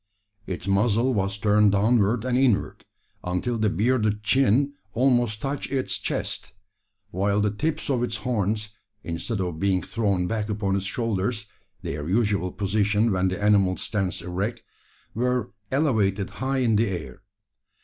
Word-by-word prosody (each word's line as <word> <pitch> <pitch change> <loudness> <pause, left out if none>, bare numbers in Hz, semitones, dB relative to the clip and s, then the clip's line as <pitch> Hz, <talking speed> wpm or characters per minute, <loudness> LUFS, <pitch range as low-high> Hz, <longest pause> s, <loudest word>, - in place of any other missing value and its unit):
Its 95 +1 -5
muzzle 110 +5 +2
was 100 -2 -1
turned 105 0 +4
downward 110 +2 +2
and 125 -1 0
inward, 125 -6 +1 0.4
until 90 +7 -1
the 110 -1 +2
bearded 105 +1 +1
chin 135 +4 +3 0.2
almost 120 -4 +2
touched 140 +1 -3
its 135 -2 -1
chest; - - -3 0.6
while 100 +3 +1
the 105 0 +2
tips 155 +9 -2
of 130 -4 +1
its 120 -3 -1
horns, 105 -3 0 0.3
instead 85 +6 -3
of 90 -4 -3
being 95 -2 +1
thrown 100 -6 0
back 110 +2 -2
upon 100 -2 0
its 95 0 -2
shoulders 110 +1 -1 0.4
their 75 +3 -4
usual 100 -3 +1
position 105 +2 +1
when 95 0 +1
the 95 +2 -2
animal 100 -3 +3
stands 95 -2 -2
erect 100 +6 -3 0.5
were, 125 0 0 0.2
elevated 110 -9 +1
high 135 +1 -2
in 120 -4 +2
the 115 - +2
air. 80 -7 -5
105 Hz, 145 wpm, -25 LUFS, 95-120 Hz, 0.6 s, turned